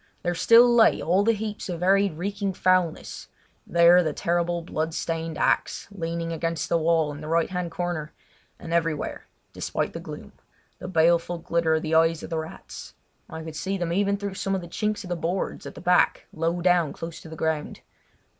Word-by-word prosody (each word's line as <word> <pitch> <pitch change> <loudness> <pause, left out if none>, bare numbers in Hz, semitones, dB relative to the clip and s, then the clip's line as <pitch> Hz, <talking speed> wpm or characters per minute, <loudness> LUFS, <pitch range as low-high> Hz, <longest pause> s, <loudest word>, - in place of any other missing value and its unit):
There 175 - 0
still 230 +8 +6
lay 235 -2 +5
all 185 +5 +2
the 230 - +4
heaps 210 -2 -5
of 175 -1 -4
varied 195 0 +3
reeking 200 +2 -2
foulness; 185 -3 0 0.4
there 170 +1 +6
the 155 -3 -1
terrible 170 +1 -1
blood 160 -1 -3
stained 165 -1 -3
axe - - 0
leaning 165 -3 -3
against 165 -1 -2
the 170 - +3
wall 160 -2 +2
in 145 +1 -8
the 155 - -7
right 165 +2 +1
hand 180 -2 -2
corner, 170 -3 -3 0.5
and 165 - -7
everywhere, 165 -3 -1 0.3
despite - - -3
the - - -5
gloom, - - -9 0.5
the - - -7
baleful 170 0 +2
glitter 165 -1 +1
of 160 - -1
the 155 - -2
eyes 165 0 +3
of - - -8
the 165 - -1
rats. 160 0 -9 0.3
I 160 0 -7
could 160 -1 -8
see 195 +5 -2
them 175 -2 -2
even 200 +2 +1
through 200 -1 -4
some 195 0 -2
of 190 - -2
the 175 - -9
chinks 210 +5 -2
of 180 - -9
the 175 - -1
boards 175 +3 -3
at - - -9
the - - -9
back 180 0 +3
low 165 +2 -1
down 175 -4 +3
close 165 0 -7
to 160 - -11
the 160 - -8
ground. 160 -1 -2
170 Hz, 200 wpm, -25 LUFS, 165-185 Hz, 0.5 s, still